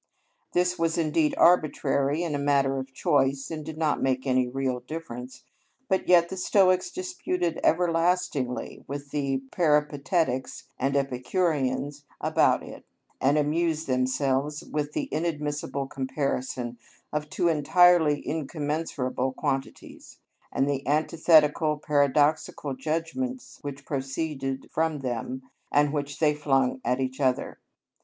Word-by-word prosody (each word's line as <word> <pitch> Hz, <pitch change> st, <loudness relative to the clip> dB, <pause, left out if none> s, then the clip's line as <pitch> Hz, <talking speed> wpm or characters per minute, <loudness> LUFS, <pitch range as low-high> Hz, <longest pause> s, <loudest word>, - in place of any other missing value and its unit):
This 180 Hz, 0 st, +1 dB
was 165 Hz, 0 st, +1 dB
indeed 155 Hz, -1 st, +1 dB
arbitrary 155 Hz, -2 st, +3 dB
and 160 Hz, -4 st, -2 dB
a -, -, -2 dB
matter 140 Hz, -1 st, +2 dB
of 135 Hz, 0 st, -7 dB
choice, 135 Hz, +1 st, +1 dB
and 155 Hz, -1 st, -4 dB
did 155 Hz, +1 st, -7 dB
not 155 Hz, -2 st, 0 dB
make 130 Hz, 0 st, 0 dB
any 130 Hz, -1 st, +2 dB
real 130 Hz, 0 st, -2 dB
difference, 125 Hz, -3 st, -8 dB, 0.4 s
but 190 Hz, -5 st, 0 dB
yet 175 Hz, -1 st, +6 dB
the 190 Hz, -, -5 dB
Stoics 185 Hz, -, +3 dB
disputed 330 Hz, -, -2 dB
everlastingly 165 Hz, -6 st, 0 dB
with 140 Hz, 0 st, -6 dB
the 135 Hz, -2 st, -1 dB
Peripatetics 150 Hz, -3 st, +1 dB, 0.2 s
and 135 Hz, +2 st, 0 dB
Epicureans 140 Hz, +1 st, -1 dB, 0.2 s
about -, -, +2 dB
it, -, -, -10 dB, 0.4 s
and 140 Hz, +3 st, +3 dB
amused 160 Hz, +2 st, +1 dB
themselves 130 Hz, +3 st, 0 dB
with 150 Hz, 0 st, -3 dB
the -, -, -2 dB
inadmissible 150 Hz, -3 st, -2 dB
comparison 130 Hz, -3 st, -3 dB, 0.3 s
of 150 Hz, 0 st, -2 dB
two 175 Hz, -, 0 dB
entirely 165 Hz, -1 st, +4 dB
incommensurable 145 Hz, -4 st, -2 dB
quantities, 135 Hz, 0 st, -4 dB, 0.3 s
and 135 Hz, -, +1 dB
the 140 Hz, -2 st, 0 dB
antithetical, 155 Hz, 0 st, +3 dB
paradoxical 145 Hz, 0 st, +1 dB
judgments 165 Hz, -, -3 dB
which 140 Hz, -1 st, -7 dB
proceeded 135 Hz, -1 st, -3 dB
from 160 Hz, -2 st, 0 dB
them, 125 Hz, +1 st, -4 dB, 0.3 s
and 145 Hz, 0 st, +3 dB
which 145 Hz, -1 st, -3 dB
they 155 Hz, -2 st, +3 dB
flung 135 Hz, -3 st, +1 dB
at 125 Hz, +1 st, 0 dB
each 130 Hz, 0 st, -3 dB
other. 130 Hz, -2 st, 0 dB
145 Hz, 120 wpm, -26 LUFS, 135-160 Hz, 0.4 s, yet